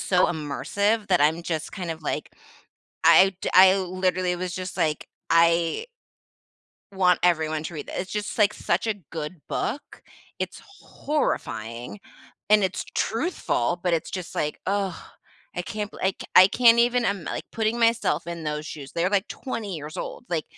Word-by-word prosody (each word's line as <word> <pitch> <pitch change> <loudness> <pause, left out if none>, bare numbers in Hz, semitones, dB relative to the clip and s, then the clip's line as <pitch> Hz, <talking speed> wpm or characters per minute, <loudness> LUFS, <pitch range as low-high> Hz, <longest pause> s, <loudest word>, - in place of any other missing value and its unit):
so 180 -1 +3
immersive 200 +8 -1
that 180 -5 +3
I'm 160 +3 +3
just 160 -3 -3
kind 180 -4 -5
of 160 -1 -6
like - - -3 0.7
I'd 190 -1 +6 0.2
I 190 +1 +8
literally 185 -1 0
was 180 0 -4
just 185 0 -5
like, 155 -1 0 0.2
I 170 - +3 1.1
want 180 -2 +3
everyone 160 -3 +2
to 170 - -6
read 150 - -7
the - - -3
it's 185 - -6
just 210 +1 -4
like 210 0 +4
such 180 +6 -1
a 220 - +1 0.2
good 155 +1 -6
book. 285 - -4 0.4
It's - - -5 0.2
horrifying, 120 - -3 0.5
and 210 -1 +6
it's 185 - -2
truthful, 220 - -1
but 175 -2 +2
it's 160 - -2
just 180 -3 -6
like, 150 0 -2
oh, 195 -3 -1 0.6
I 175 - -1
can't 210 +2 -4
beli - - -11
I - - +5
c - - -7
I 185 - +10
can't 235 0 +5
even 240 0 +3
I'm 195 -5 -1
like - - -4
putting 225 +1 0
myself 230 -5 +2
in 170 -2 -6
those 150 0 -3
shoes, 140 -4 -8
they're 175 +3 +1
like 200 -2 +1
20 225 -7 -5
years 150 +1 -8
old, 245 - -6
like, 160 -4 -1
180 Hz, 170 wpm, -25 LUFS, 160-205 Hz, 1.1 s, I